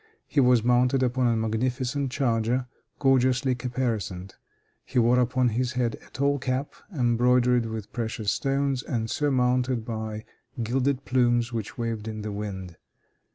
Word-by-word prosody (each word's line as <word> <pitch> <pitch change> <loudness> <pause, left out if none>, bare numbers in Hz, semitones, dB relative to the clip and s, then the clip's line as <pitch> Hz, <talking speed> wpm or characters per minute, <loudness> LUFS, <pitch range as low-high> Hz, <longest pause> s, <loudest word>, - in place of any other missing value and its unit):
He 145 - 0
was 125 -3 +5
mounted 125 +2 +3
upon 125 0 +1
a 115 - +2
magnificent 125 +5 -1
charger, 120 -1 0 0.3
gorgeously 130 -1 +3
caparisoned. 115 -7 -3 0.5
He - - -5
wore 120 +1 +4
upon 125 0 +2
his 125 +2 -1
head 120 -3 0
a - - -18
tall 140 +1 0
cap, 130 +2 -2 0.2
embroidered 125 -3 +3
with 110 -2 -6
precious 110 -3 -2
stones, 135 0 0
and 115 -4 -3
surmounted 125 -4 +1
by 110 -1 -5 0.4
gilded 130 +3 0
plumes 120 -1 +2
which 110 -3 -4
waved 115 -2 -3
in 110 -1 -5
the 105 - -4
wind. 95 -4 -6
125 Hz, 140 wpm, -26 LUFS, 115-130 Hz, 0.5 s, was